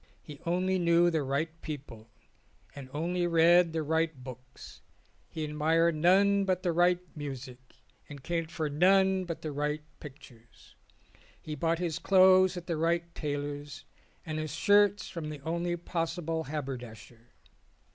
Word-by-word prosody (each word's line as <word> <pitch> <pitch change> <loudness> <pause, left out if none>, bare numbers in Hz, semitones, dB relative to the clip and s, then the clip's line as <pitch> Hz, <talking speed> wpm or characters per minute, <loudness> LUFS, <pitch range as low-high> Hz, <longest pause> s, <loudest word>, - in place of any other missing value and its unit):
He 145 -3 -11
only 185 +2 +1
knew 170 0 +3
the 160 -2 0
right 155 +4 -3
people 130 -7 -8 0.6
and 135 -2 -10
only 175 +4 -1
read 170 +1 +5
the 160 -1 -2
right 160 +1 0
books; 125 -1 -12 0.5
he 160 - -5
admired 160 +3 +2
none 195 +5 +3
but 185 -1 -1
the 175 - +1
right 175 +1 +3 0.2
music 135 -4 -7 0.5
and 140 -2 -10
cared 165 0 -2
for 160 -2 -3
none 190 +5 +3
but 165 -2 -6
the 155 - -3
right 150 +1 -2 0.2
pictures; 130 -5 -15 0.6
he 155 - -7
bought 165 +3 0
his 170 -2 -3
clothes 185 -1 +5
at 175 - -7
the 170 -3 -2
right 170 +1 -1
tailor's 145 -1 -5 0.4
and 155 -1 -4
his 155 -1 -4
shirts 205 +1 +3
from 160 -3 -6
the 150 -1 -7
only 170 +3 -2
possible 165 -1 -3
haberdasher. 120 -5 -8
160 Hz, 145 wpm, -29 LUFS, 145-175 Hz, 0.6 s, read